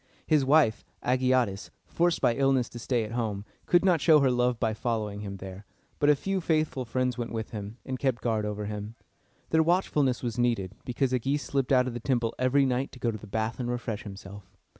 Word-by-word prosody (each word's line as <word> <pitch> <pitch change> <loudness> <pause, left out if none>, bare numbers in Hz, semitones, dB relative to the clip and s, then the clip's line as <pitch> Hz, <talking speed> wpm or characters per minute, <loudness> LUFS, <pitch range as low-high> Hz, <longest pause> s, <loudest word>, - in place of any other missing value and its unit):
His 155 -3 +3
wife, 135 -5 +3 0.2
A 125 - +2
gi 130 0 -1
a´tis, 120 -7 +1 0.2
forced 170 0 +1
by 120 - +4
illness 135 -1 +2
to 120 - -9
stay 120 0 0
at 105 - -6
home, 110 -4 -2 0.2
could 175 +1 +4
not 175 -5 +3
show 155 +1 +6
her 135 -2 +3
love 125 -1 +1
by 110 -3 +1
following 110 -3 -2
him 100 -1 -6
there; 95 +1 -9 0.4
but 145 - +3
a 150 - +6
few 195 +6 -2
faithful 155 -5 0
friends 125 +1 -1
went 120 - -3
with 110 -1 -4
him, 105 +1 -6
and 130 -1 -4
kept 130 -4 -1
guard 110 -3 0
over 105 0 -3
him. 105 +1 -6 0.6
Their 160 - +5
watchfulness 155 -7 +1
was 120 0 -3
needed, 115 -6 0
because 130 +1 0
Agis 135 +3 0
slipped 135 +1 -1
out 125 -1 +5
of 130 - -3
the 120 - -4
temple 120 -2 0
every 130 +2 +3
night 130 +1 -1
to 130 - -11
go 120 - 0
to 110 - -5
the 105 - -11
bath 110 +3 -2
and 120 -1 -2
refresh 120 -3 -3
himself. 100 -2 -11
120 Hz, 225 wpm, -28 LUFS, 110-135 Hz, 0.6 s, show